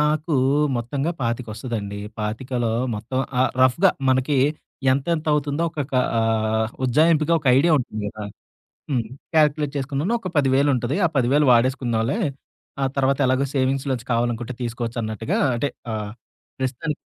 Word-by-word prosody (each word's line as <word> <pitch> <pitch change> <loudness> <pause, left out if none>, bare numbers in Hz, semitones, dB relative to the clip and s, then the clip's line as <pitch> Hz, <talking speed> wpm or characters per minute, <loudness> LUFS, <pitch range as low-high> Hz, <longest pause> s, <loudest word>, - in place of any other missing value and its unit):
నాకు 150 +1 +1 0.4
మొత్తంగా 135 +6 -2
పాతిక 115 +1 -2
వస్తదండి. 105 -4 -5 0.2
పాతికలో 115 +2 -2 0.2
మొత్తం 115 +5 -4 0.2
ఆహ్, 130 - +3
రఫ్‌గా 165 +9 +5 0.2
మనకి 130 +2 +2 0.6
ఎంత 135 +3 -1
ఎంతవుతుందో 150 0 0
ఒక 155 - -5
కా 130 - +3 0.2
ఆహ్, 110 0 +1
ఉజ్జాయింపుగా 155 +4 +3
ఒక 140 - -9
ఐడియా 165 +3 +3
ఉంటుంది 110 -4 -4
కదా! 105 0 -8 0.7
హ్మ్. 120 -5 0 0.3
క్యాలిక్యులేట్ 150 -2 +2
చేసుకున్నాను. 140 - -1
ఒక 190 - -6
100ే00 135 -1 +2
ఆ - - +5
10000 135 +4 +3
వాడేసుకుందాామలేే. 120 - +1 0.6
ఆ - - +3
తర్వాత 135 0 +2
ఎలాగో 130 +2 +2
సేవింగ్స్‌లోంచి 130 -2 0
కావాలనుకుంటే 120 +1 -1
తీసుకోవచ్చన్నట్టుగా 115 -2 -3 0.2
అంటే, 140 +4 -1 0.2
ఆహ్, 105 -1 -4 0.5
ప్రస్తుతానికి 135 +4 -3
130 Hz, 125 wpm, -22 LUFS, 115-145 Hz, 0.7 s, రఫ్‌గా